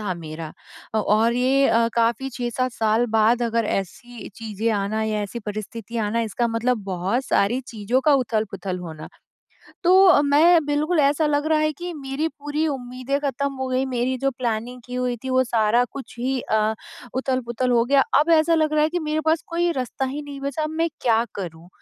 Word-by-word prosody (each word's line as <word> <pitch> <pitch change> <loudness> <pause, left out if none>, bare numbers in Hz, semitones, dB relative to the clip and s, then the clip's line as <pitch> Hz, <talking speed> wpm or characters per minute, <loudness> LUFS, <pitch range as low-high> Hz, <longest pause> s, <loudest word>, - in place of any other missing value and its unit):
था 200 -4 -2
मेरा। 160 -1 -7 0.4
अ, - - +3
और 215 +3 +2
ये 265 +2 +3
अ, 230 0 +3
काफ़ी 235 +3 +1
6-7 250 +1 -2
साल 225 +1 +1
बाद 230 +3 +3
अगर 230 -1 0
ऐसी 230 +6 -5
चीजें 225 0 -2
आना 210 +1 -1
या 215 -1 -1
ऐसी 205 +4 -5
परिस्थिति 215 +2 -6
आना 230 +2 0
इसका 235 +4 0
मतलब 230 0 0
बहुत 195 +7 -1
सारी 230 +6 +2
चीज़ों 225 +3 -1
का 295 +2 +4
उथल-पुथल 215 -7 -2
होना। 160 -3 -8 0.8
तो, 365 -3 +6
मैं 315 +3 +5
बिल्कुल 300 +3 +1
ऐसा 290 +2 +2
लग 295 0 0
रहा 315 -1 +3
है 310 0 +1
कि 350 +4 -6
मेरी 280 +2 -3
पूरी 295 +2 -1
उम्मीदें 255 0 -3
ख़त्म 280 0 -2
हो 260 0 -3
गई, 255 +1 0
मेरी 255 0 -1
जो 275 +1 +1
प्लानिंग 245 -1 -3
की 250 - -8
हुई 250 -1 -1
थी 260 - -3
वो 260 0 +4
सारा 235 0 +2
कुछ 275 - -9
ही 260 +1 -1
अ, 220 0 0 0.4
उथल-पुथल 255 -1 -1
हो 235 -1 +4
गया। 275 +1 +4 0.2
अब 310 +3 +1
ऐसा 330 0 +4
लग 310 -1 +1
रहा 300 - +3
है 305 - +3
कि 355 - -1
मेरे 310 0 -1
पास 320 0 +2
कोई 345 +1 0
रास्ता 260 -2 -3
ही 285 +3 -4
नहीं 285 -1 -8
बचा, 280 +2 -3
अब 305 - -2
मैं 325 +1 0
क्या 230 -1 +3
करूँ 170 -3 -7
250 Hz, 195 wpm, -23 LUFS, 220-285 Hz, 0.8 s, तो